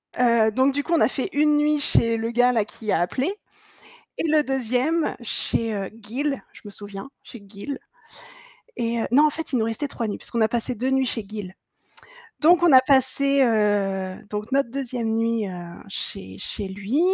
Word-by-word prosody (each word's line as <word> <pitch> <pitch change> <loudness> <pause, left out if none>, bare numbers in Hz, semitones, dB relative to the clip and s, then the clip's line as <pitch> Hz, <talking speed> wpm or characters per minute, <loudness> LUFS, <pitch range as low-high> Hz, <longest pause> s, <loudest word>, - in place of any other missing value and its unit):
Heu, 235 -3 +4
donc 260 +4 +2
du 285 - -1
coup 340 - -2
on 325 - +4
a - - +6
fait - - -3
1 300 0 +3
nuit 300 0 +2
chez 230 -5 +2
le 225 +1 -2
gars 245 +1 +4
là 220 -4 +1
qui 215 -1 -5
a - - +2
appelé 265 - -1 0.8
et - - -2
le 305 -1 +4
2e 265 +5 0
chez, 225 -1 -1
heu, 195 -2 -3
Gill, 270 +6 -3
je - - -16
me - - -7
souviens 205 +4 -8
chez 235 - -11
Gill, 210 +8 -7 1.0
et 235 0 -1
heu - - -1
non 290 +5 +6
en 305 - +4
fait 320 +1 -6
il 255 - +1
nous 220 - +1
restait 230 +6 -2
3 235 -5 -4
nuits 205 - -3
puisqu'on 235 - -3
a 220 - +5
passé 240 +2 -2
2 255 +4 -1
nuits 265 0 +2
chez 225 -2 -3
Gill, 205 -3 -7 0.9
donc 345 +2 +5
on 345 - +6
a 260 -1 +9
passé, 275 +1 +3
heu, 200 -4 +1
donc 210 +4 -5
notre 275 -3 +2
2e 245 -3 -3
nuit, 225 -1 0
heu, 185 - -6 0.4
chez 95 - -5
chez 205 -3 -4
lui 205 +9 -2
235 Hz, 200 wpm, -24 LUFS, 215-275 Hz, 1.0 s, a